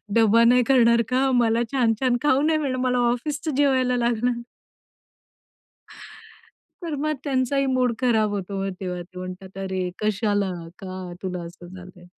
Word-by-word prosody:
डब्बा 230 0 +5
नाही 245 +1 +5
करणार 235 -3 +5
का? 265 +1 +2
मला 235 -1 +2
छान-छान 245 0 +2
खाऊ 275 -1 +3
नाही 310 +1 +2
मिळणार, 260 -4 -2
मला 250 -1 +1
ऑफिसचं 295 +3 -3
जेवायला 260 -3 +2
लागणार?" 240 0 0 2.4
तर 330 -3 -3
मग 310 0 0
त्यांचाही 275 0 0
मूड 255 -2 +1
खराब 220 -4 +2
होतो 200 -1 -4
मग 195 - -2
तेव्हा 180 -2 -4
ते 180 +1 -13
म्हणतात 185 +1 -8
"अरे! 190 -2 -3
कशाला? 205 -2 0 0.3
का 185 -2 -7
तुला 180 -2 -4
असं 175 +1 -11
झालंय?" 180 0 -12
235 Hz, 145 wpm, -23 LUFS, 190-255 Hz, 2.4 s, डब्बा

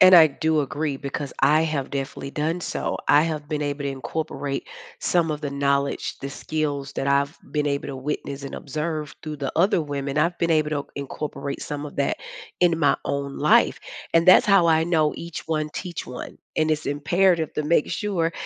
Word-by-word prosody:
And 185 0 +9
I 160 -3 +9
do 155 +2 +1
agree 145 0 -2
because 140 0 -5
I 150 +4 +5
have 150 -4 -2
definitely 135 0 -4
done 160 +4 -1
so. - - -2
I 145 +1 +7
have 155 -2 -3
been 150 -1 -1
able 145 0 -2
to 140 - -1
incorporate 135 +1 -4 0.3
some 170 -3 +2
of 150 - -5
the 145 - -3
knowledge, 140 0 0
the 140 - -5
skills 145 -2 -3
that 135 - -2
I've 140 +2 +2
been 150 -1 0
able 140 0 -1
to 135 - -5
witness 140 0 -4
and - - -6
observe 150 -1 -4
through 150 -1 -5
the 140 - -2
other 170 -1 +3
women, 140 -1 -3
I've 170 +3 +2
been 170 -1 +2
able 155 -1 +2
to 145 -2 -2
incorporate 140 0 -5
some 145 0 -4
of 145 - -9
that 140 - 0 0.4
in 170 -2 +4
my 145 -3 +4
own 140 0 -3
life, - - +4 0.3
and 165 +2 +4
that's 185 - +8
how 195 -4 +5
I 160 0 +4
know 160 -3 +2
each 170 -1 -7
one, 155 -1 0
teach 180 -3 -5
one. 125 0 -8 0.2
And 155 0 +2
it's 155 0 0
imperative 160 +3 +2
to 150 - -1
make 155 -1 +2
sure, 175 -6 0
150 Hz, 200 wpm, -24 LUFS, 140-160 Hz, 0.4 s, And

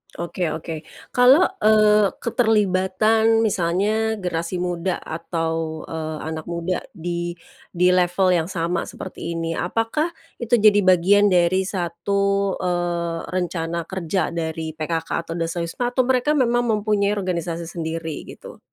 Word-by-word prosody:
Oke 175 +1 -3
oke. 160 -1 -6 0.3
Kalau, 255 +8 +6 0.2
eee, 215 -1 +5 0.2
keterlibatan 220 0 +2
misalnya 210 +4 +1
generasi 170 0 -2
muda 180 0 -1
atau, 165 -1 -3
eee, 155 -1 -4
anak 160 -1 -5
muda 170 +1 -2 0.2
di 175 +1 -3 0.4
di 180 +1 +3
level 180 +1 +2
yang 170 -2 +1
sama 175 -2 -2
seperti 170 -2 -6
ini, 165 0 -2
apakah 225 - 0 0.3
itu 235 0 +2
jadi 210 -2 +5
bagian 195 +3 +5
dari 185 +1 +3
satu, 200 +2 0
eee, 175 -2 -1
rencana 170 -2 -2
kerja 185 +1 -2
dari 160 -1 -3
PKK 165 +1 -3 0.2
atau 165 - -5
Dasawisma 170 +8 -2
atau 255 0 +1
mereka 260 +3 +2
memang 240 -2 +2
mempunyai 210 -1 +1
organisasi 170 -4 -2
sendiri 165 -2 -5
gitu? - - -11
180 Hz, 125 wpm, -22 LUFS, 165-205 Hz, 0.4 s, Kalau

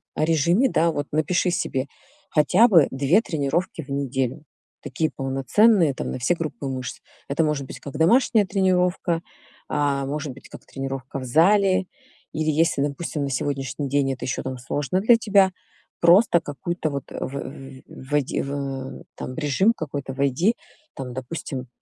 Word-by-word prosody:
о - - +1
режиме, 170 - +3
да, 165 +1 +2
вот 145 -1 -3
напиши 170 +4 +1
себе 135 -6 -1 0.5
хотя 180 +10 +5
бы 170 - +6
2 145 +10 +3
тренировки 160 - -2
в 140 - -17
неделю. 135 0 -2 0.4
Такие 160 -1 -2
полноценные 140 - +3
там, - - -4
на - - -3
все 145 +8 +2
группы 155 -3 -5
мышц. 130 -2 -5 0.3
Это 150 +3 +1
может 145 -3 -1
быть - - -9
как 140 +1 -9
домашняя 215 +4 +4
тренировка, 180 -2 +1 0.5
а 140 -2 0
может 145 -1 -4
быть 135 - -15
как - - -12
тренировка 135 0 -5
в - - -7
зале 185 +7 +4 0.5
или 155 0 -1
если, 155 -2 +2
допустим, 145 +1 -2
на 140 - -2
сегодняшний 135 +1 -2
день 135 -1 +1
это 130 - -6
ещё 125 - -2
там 130 -1 -4
сложно 145 +8 -2
для 230 +3 +6
тебя, 200 -4 +4 0.5
просто 175 +2 +5
какой-то 160 +3 -3
вот 140 -2 -4
в - - -4
вь 135 0 -8
войди 140 +1 -2
в 135 -1 -5
там, 130 - -6
в - - -15
режим 160 +9 +2
какой-то 140 -5 -5
войди, 140 - +1 0.4
там, 130 -2 -6
допустим, 130 0 -5
145 Hz, 160 wpm, -23 LUFS, 135-175 Hz, 0.5 s, бы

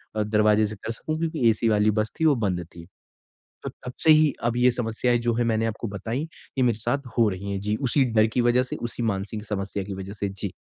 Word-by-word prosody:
अ, 110 - +1
दरवाज़े 105 0 +3
से 110 - -7
कर 110 +3 -6
सकूँ 155 +7 -4
क्योंकि 160 -7 +2
एसी 115 +1 +1
वाली 105 0 +3
बस 110 - -4
थी 160 - +2
वो 150 -3 +5
बंद 95 -7 -1
थी। 85 -1 -10 0.8
तो - - -3
तब 125 - -10
से 160 - +7
ही 155 -1 +5
अब 120 0 0
ये 125 +1 +5
समस्याएँ 120 0 0
जो 120 - +3
है 120 - +1
मैंने 115 -1 +1
आपको 115 +1 -3
बताईं 110 +6 -4 0.4
ये - - +2
मेरे 120 -3 +2
साथ 125 +4 -2
हो 115 -2 +5
रही 100 +1 -5
हैं 100 - -2
जी 105 +1 -1
उसी 135 +1 +2
डर 110 -2 +3
की 110 +3 0
वजह 120 +1 +3
से, 130 - -6
उसी 120 0 -5
मानसिक 105 0 -3
समस्या 100 -1 -3
की 100 +1 -6
वजह 95 +1 -7
से। 100 -1 -3
जी। 100 0 -5
110 Hz, 250 wpm, -25 LUFS, 105-125 Hz, 0.8 s, से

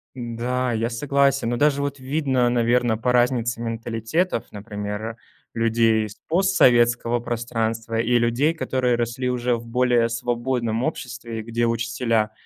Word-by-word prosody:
Да, 125 +1 -2
я 115 +1 0
согласен. 140 0 +1
Но 120 - -1
даже 145 -1 +2
вот 140 -1 -3
видно, 130 -3 +1
наверно, 120 -1 +2
по 125 +2 0
разнице 120 -1 +1
менталитетов, 115 +7 -2
например, 105 +1 -5 0.4
людей 115 -1 +2
из 105 -1 -9
постсоветского 120 -10 +3
пространства 115 -1 -2
и 120 +1 +2
людей, 120 +7 +2
которые 130 -6 0
росли 120 +2 -2
уже 125 -1 0
в 115 0 -7
более 120 -1 +2
свободном 120 0 -1
обществе, 120 -6 -4
где 115 +1 -1
учителя 115 -1 0
120 Hz, 130 wpm, -23 LUFS, 115-125 Hz, 0.4 s, постсоветского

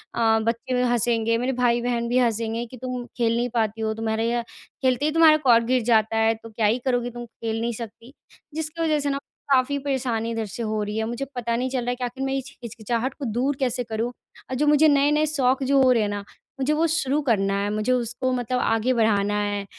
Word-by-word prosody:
अ, - - -3 0.2
बच्चे 235 +3 -1
हँसेंगे, 230 -1 +1
मेरे 250 +3 -1
भाई-बहन 240 -1 +1
भी 245 - +1
हँसेंगे 230 -1 0
कि, 255 +2 -12
"तुम 250 0 -5
खेल 230 -2 +2
नहीं 245 +1 0
पाती 225 -1 0
हो, 220 0 0
तुम्हारे 220 0 -1
यह 240 0 0 0.4
खेलते 260 +1 +1
ही 305 - +2
तुम्हारा 320 -1 +6
कॉर्क 230 -2 +5
गिर 255 +1 +2
जाता 220 0 +3
है, 225 0 +3
तो 225 +1 -12
क्या 220 0 -1
ही 220 +4 +2
करोगी, 245 -2 0
तुम 240 0 -7
खेल 225 -1 -5
नहीं 235 +1 -1
सकती।" 230 +2 -9 0.4
जिसकी 320 +1 -4
वजह 310 -2 +2
से 285 0 -1
ना 275 - -1 0.3
काफ़ी 270 +1 +3
परेशानी 250 -5 -2
इधर 225 -1 -2
से 225 +3 -6
हो 215 -1 -1
रही 210 +1 -4
है, 220 - 0
मुझे 240 +4 -3
पता 235 -1 -1
नहीं 255 +2 -1
चल 260 0 -1
रहा - - -1
है 245 - 0
कि 250 - -6
आख़िर 250 +2 -4
मैं 270 - -1
इस 270 0 -5
हिचकिचाहट 235 +3 -3
को 280 - -4
दूर 250 +5 0
कैसे 250 -2 0
करूँ। 225 +1 -3 0.4
अ, - - -4
जो 290 +4 +1
मुझे 300 +1 +5
नए-नए 295 +1 +3
शौक़ 270 -3 +1
जो 275 +1 +3
हो 255 -1 +5
रहे 225 -4 +2
ना, 205 0 -4 0.4
मुझे 270 +3 +1
वो 315 +2 +2
शुरू 300 -3 0
करना 195 -3 +2
है, 205 - -1
मुझे 215 +4 0
उसको 250 +1 -1
मतलब 250 0 -1
आगे 225 +2 +1
बढ़ाना 205 -3 +2
है। 205 -1 -2
240 Hz, 230 wpm, -24 LUFS, 225-260 Hz, 0.4 s, तुम्हारा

